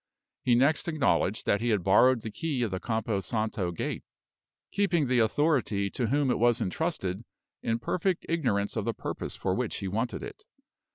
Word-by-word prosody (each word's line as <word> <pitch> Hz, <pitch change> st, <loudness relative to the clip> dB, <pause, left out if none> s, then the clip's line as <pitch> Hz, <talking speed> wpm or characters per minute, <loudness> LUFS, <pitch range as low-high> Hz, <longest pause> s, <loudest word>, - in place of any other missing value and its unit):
He 120 Hz, -, +3 dB
next 140 Hz, +7 st, +3 dB
acknowledged 140 Hz, -, +1 dB
that 100 Hz, -, +2 dB
he 120 Hz, -, 0 dB
had 105 Hz, -5 st, +1 dB
borrowed 115 Hz, +6 st, +5 dB
the 110 Hz, -, -6 dB
key 140 Hz, +1 st, -2 dB
of 110 Hz, -, -1 dB
the 95 Hz, -, -2 dB
Campo 110 Hz, -1 st, -1 dB
Santo 110 Hz, -2 st, -2 dB
gate, 85 Hz, -, -4 dB, 0.7 s
keeping 175 Hz, -7 st, +2 dB
the 125 Hz, -1 st, +2 dB
authority 115 Hz, -5 st, +1 dB
to 120 Hz, -, -1 dB
whom 140 Hz, +2 st, +2 dB
it -, -, 0 dB
was 120 Hz, 0 st, +3 dB
intrusted 95 Hz, -, -2 dB, 0.4 s
in 115 Hz, 0 st, 0 dB
perfect 180 Hz, +9 st, -1 dB
ignorance 125 Hz, -12 st, 0 dB
of -, -, -2 dB
the -, -, -1 dB
purpose -, -, -5 dB
for -, -, -1 dB
which -, -, -2 dB
he 100 Hz, -, -4 dB
wanted 115 Hz, +6 st, -2 dB
it. -, -, -9 dB
120 Hz, 180 wpm, -28 LUFS, 105-145 Hz, 0.7 s, borrowed